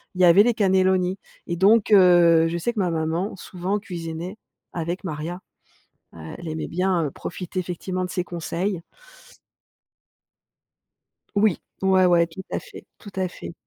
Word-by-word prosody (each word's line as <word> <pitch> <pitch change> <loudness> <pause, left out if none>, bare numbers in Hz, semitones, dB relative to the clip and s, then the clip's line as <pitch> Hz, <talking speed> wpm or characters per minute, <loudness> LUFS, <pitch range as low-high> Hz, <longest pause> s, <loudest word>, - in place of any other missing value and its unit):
Il 185 - -1
y - - +8
avait 180 +4 +7
les 240 0 +2
cannellonis. 190 -2 +2 0.3
Et 170 - -2
donc 210 +3 +4
heu, 175 -4 +6
je 170 - -2
sais 235 +8 -1
que 215 - -4
ma 180 -3 +1
maman 165 +5 -2
souvent 185 +3 -3
cuisinait 175 0 -6 0.4
avec 175 +3 -3
Maria. 165 +2 -5 0.7
Heu, 80 -1 -9
elle 170 -2 -7
aimait 155 0 -4
bien 180 -4 0
profiter, 185 +1 -5
effectivement, 185 +1 -4
de 180 - -5
ses 180 - -2
conseils. 175 +1 -3 2.5
Oui. 205 -2 +2 0.2
Ouais, 190 -1 +4
ouais, 170 -1 +4
tout 180 +3 -9
à - - 0
fait - - -12
tout 205 - -11
à 185 -1 0
fait. 170 - -9
180 Hz, 155 wpm, -23 LUFS, 170-190 Hz, 2.5 s, y